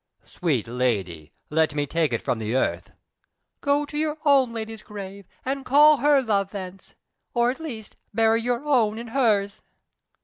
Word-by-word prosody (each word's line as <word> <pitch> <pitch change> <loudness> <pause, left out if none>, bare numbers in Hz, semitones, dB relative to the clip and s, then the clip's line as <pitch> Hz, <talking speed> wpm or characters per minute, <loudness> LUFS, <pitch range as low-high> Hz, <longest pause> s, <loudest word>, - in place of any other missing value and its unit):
"Sweet 145 - -1
lady, 100 -11 -2 0.2
let 155 -1 +1
me 145 -1 0
take 160 +1 0
it 115 - -2
from 115 - -1
the 110 +2 -2
earth." 130 - -1 0.7
"Go 285 +1 +1
to 295 - -11
your 305 0 -1
own 270 -4 +4
lady's 225 -1 -6
grave, 200 -2 -9 0.2
and 270 +1 -2
call 295 +3 +6
her 280 +1 +3
love 200 -4 0
thence, 190 -2 -9 0.4
or, 240 0 +3
at 265 - -9
least, 235 -10 -8
bury 225 +1 +3
your 245 +4 -2
own 230 -7 +2
in 235 0 -7
hers." 215 -6 +1
220 Hz, 165 wpm, -24 LUFS, 165-265 Hz, 0.7 s, call